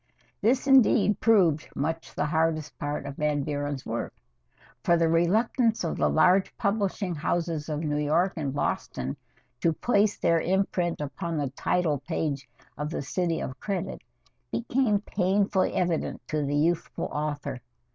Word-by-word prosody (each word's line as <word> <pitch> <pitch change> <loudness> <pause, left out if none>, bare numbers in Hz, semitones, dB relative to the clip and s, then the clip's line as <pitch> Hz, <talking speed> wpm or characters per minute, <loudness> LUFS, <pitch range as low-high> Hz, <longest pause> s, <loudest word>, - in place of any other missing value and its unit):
This 250 +6 +2
indeed 260 -6 +5
proved 180 -9 +3
much 160 +3 -3
the - - 0
hardest 155 -1 0
part 145 0 -3
of 140 0 -7
Van 150 -1 0
Buren's 145 -1 -3
work, 115 +1 -4 0.7
for 170 - +4
the 165 0 +3
reluctance 215 +8 +2
of 165 - -2
the - - +2
large 180 +4 +3
publishing 200 -3 0
houses 165 0 -2
of 150 0 -2
New 150 -2 -1
York 160 +6 +2
and 145 -5 -2
Boston 70 - -2 0.4
to 165 - +2
place 210 +3 +2
their 165 -1 +2
imprint 180 -2 0
upon 160 +4 -4
the 140 -3 -1
title 155 0 0
page 145 -3 -3 0.3
of 150 0 -2
"The 160 - -3
City 170 +3 -1
of 130 - -5
Credit" 200 -3 -3 0.5
became 235 -3 +1
painfully 195 0 +1
evident 175 -3 -1
to 155 -1 0
the 145 +1 -1
youthful 165 +3 0
author. 145 -3 -3
165 Hz, 145 wpm, -27 LUFS, 150-190 Hz, 0.7 s, indeed